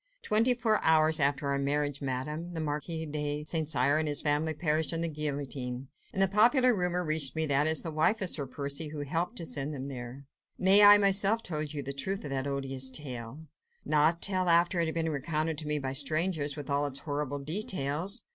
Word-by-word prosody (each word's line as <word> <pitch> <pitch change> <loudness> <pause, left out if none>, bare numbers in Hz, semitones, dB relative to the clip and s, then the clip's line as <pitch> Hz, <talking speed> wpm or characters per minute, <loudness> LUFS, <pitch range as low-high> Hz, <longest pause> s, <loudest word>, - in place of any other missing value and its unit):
"Twenty 230 - +2
four 225 -3 0
hours 160 0 +3
after 140 0 +1
our 140 - 0
marriage, 145 0 -1
Madame, 150 +6 -4
the - - -3
Marquis 155 +2 -3
de 150 0 -3
St. 160 -1 -2
Cyr 140 +1 +2
and 155 - -1
all - - -1
his 145 - +1
family 150 +1 0
perished 155 0 0
on 165 - -1
the 170 - 0
guillotine, 140 -4 -4 0.2
and - - -5
the 195 - +4
popular 245 +6 +4
rumour 180 -1 -1
reached 155 -4 0
me 160 0 0
that 145 0 +1
it - - +5
was 160 - +2
the 165 - -4
wife 160 +8 +1
of 190 -3 +1
Sir 140 -3 0
Percy 140 +4 -3
Blakeney 155 - -8
who 145 -1 -5
helped 175 +7 -2
to 170 - -2
send 145 -1 -4
them 135 +1 -6
there." 125 +1 -8 0.3
"Nay! 190 +2 +7
I 205 0 +9
myself 200 +2 +2
told 155 -3 -4
you 145 - -3
the 140 +1 -4
truth 190 +9 -3
of 145 - -6
that 135 0 -2
odious 135 -1 -2
tale." 130 -1 -6 0.4
"Not 155 +3 +2
till 185 -2 +2
after 170 +1 +3
it 165 - +1
had 160 - -4
been 165 -1 -1
recounted 155 +2 -2
to 155 - -6
me 150 0 0
by 135 -2 -4
strangers, 150 +1 0
with 145 -2 -7
all 145 0 0
its 135 -1 +1
horrible 145 -1 -3
details." 165 - -1
150 Hz, 220 wpm, -29 LUFS, 140-170 Hz, 0.4 s, I